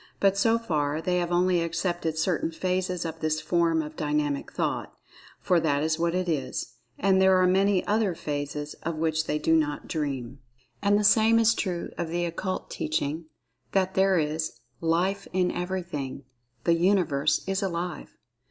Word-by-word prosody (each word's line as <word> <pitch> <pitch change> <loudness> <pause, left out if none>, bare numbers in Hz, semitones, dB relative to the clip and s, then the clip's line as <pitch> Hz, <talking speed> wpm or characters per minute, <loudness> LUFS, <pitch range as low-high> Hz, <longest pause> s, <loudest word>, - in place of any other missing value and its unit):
But 195 -1 +3
so 225 +3 +3
far, 150 -9 -1
they 180 +2 0
have 175 0 -2
only 180 0 +3
accepted 165 -1 -2
certain 160 0 0
phases 180 +1 -2
of 165 0 -5
this 155 -1 0
form 165 -2 +1
of 150 +1 -8
Dynamic 150 -2 -1
Thought—for 180 -2 -3
that 145 -2 +1
is 160 +1 0
what 170 +1 +1
it 185 0 -1
is, 135 -6 -2 0.2
and 190 0 +3
there 190 0 +5
are 185 - +4
many 190 +1 +3
other 210 -4 +1
phases 145 0 -4
of 165 0 -3
which 155 0 0
they 150 - 0
do 160 +2 +2
not 150 -2 0
dream. 135 -4 -3 0.4
And 205 0 +3
the 210 - +1
same 220 +2 +5
is 230 0 +5
true 180 -6 -3
of 170 - -1
the 175 +1 -1
Occult 185 +3 -4
Teaching 155 +1 -2 0.5
that 190 -1 +1
there 190 -1 +3
is 155 0 -1 0.3
"Life 180 +4 0
in 180 -1 +2
Everything—the 140 -8 -4
Universe 170 -5 +2
is 195 +1 -1
Alive." 175 -2 -4
170 Hz, 160 wpm, -27 LUFS, 155-185 Hz, 0.5 s, there